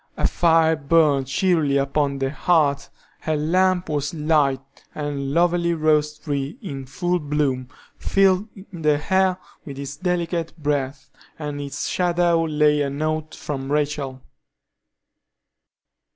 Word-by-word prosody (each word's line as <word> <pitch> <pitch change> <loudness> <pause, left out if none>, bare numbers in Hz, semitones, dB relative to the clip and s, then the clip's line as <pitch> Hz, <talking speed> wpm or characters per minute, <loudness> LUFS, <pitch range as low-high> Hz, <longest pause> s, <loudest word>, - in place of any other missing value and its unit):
A - - 0
fire 165 -1 +3
burned 145 -2 +2
cheerily 150 -1 +2
upon 140 0 0
the 135 0 -1
hearth, 150 -4 +1 0.3
her 155 -1 -1
lamp 180 +4 +2
was 145 0 -2
lighted, 150 -4 +1 0.3
a 145 -1 -3
lovely 170 +5 +1
rose 150 -1 +1
tree, 145 - -4
in 135 - -7
full 175 +6 -1
bloom, 145 -4 -1 0.3
filled 195 +1 +2 0.2
the 155 -4 +1
air 190 -1 +3 0.3
with 140 -2 -9
its 140 0 -6
delicate 170 -1 -2
breath, 145 -3 -2 0.3
and 145 -2 -5
in 140 - -5
its 140 +1 -4
shadow 175 -2 +2
lay 150 -1 +2
a 140 - 0
note 155 +2 -3
from 135 -2 -5
Rachel. 145 -3 -2
150 Hz, 125 wpm, -22 LUFS, 140-170 Hz, 0.3 s, fire